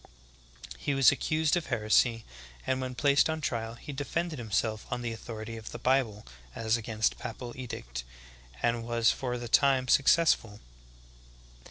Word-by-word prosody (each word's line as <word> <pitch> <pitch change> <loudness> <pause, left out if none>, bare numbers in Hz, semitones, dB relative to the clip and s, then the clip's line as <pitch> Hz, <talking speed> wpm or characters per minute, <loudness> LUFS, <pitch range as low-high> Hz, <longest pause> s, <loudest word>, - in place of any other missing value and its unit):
He 140 - -1
was 135 -2 +6
accused 155 +1 +1
of 175 -3 -2
heresy, 115 +2 +2 0.4
and 130 0 0
when 130 -1 -4
placed 140 +3 +3
on 160 0 -1
trial, 115 -5 -3
he 145 - -8
defended 155 +2 -3
himself 110 -1 -1
on 125 0 -2
the 120 - -2
authority 115 0 -7
of 110 - -10
th 120 - -7
^ - - -24
Bible 125 -5 +1 0.3
as 110 0 +1
against 110 -1 -1
papal 120 +1 -6
edict, - - -6 0.6
and 120 -1 +1
was 115 0 +2
for 125 -2 -3
the 120 0 -6
time 130 +1 +3
successful. 135 -6 +3
120 Hz, 155 wpm, -29 LUFS, 115-135 Hz, 0.6 s, was